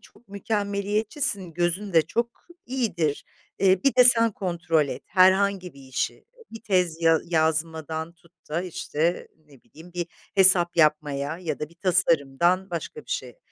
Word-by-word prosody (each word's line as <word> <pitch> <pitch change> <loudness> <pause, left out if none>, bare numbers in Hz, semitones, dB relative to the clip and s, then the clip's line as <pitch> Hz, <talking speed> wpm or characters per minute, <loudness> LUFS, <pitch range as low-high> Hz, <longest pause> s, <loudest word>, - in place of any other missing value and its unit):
çok 240 - -22
mükemmeliyetçisin, 200 - -2
gözün 175 +3 -1
de 165 -1 +5
çok 235 +9 -4 0.2
iyidir, 210 - -2 0.3
eee, 190 -1 +3
bir 275 - +3
de 250 - +6
sen 230 -2 +6
kontrol 170 -5 -1
et - - -6
herhangi 190 -1 +2
bir 140 - -15
işi, 130 -1 -4 0.3
bir 225 - -10
tez, 180 -6 0
ya 165 -1 +4
yazmadan 160 0 -1
tut 170 0 -27 0.2
da, 165 +4 -2
işte, 170 -1 -3 0.2
ne 140 -4 -20
bileyim, 170 +3 -16
bir 175 -1 -3 0.3
hesap 185 -3 +6
yapmaya 150 -1 +1
ya 175 -3 -4
da 150 - -5
bir 170 - -22
tasarımdan 175 0 +1
başka 170 - -6
bir - - -17
şeye." - - -5
175 Hz, 150 wpm, -24 LUFS, 160-200 Hz, 0.3 s, de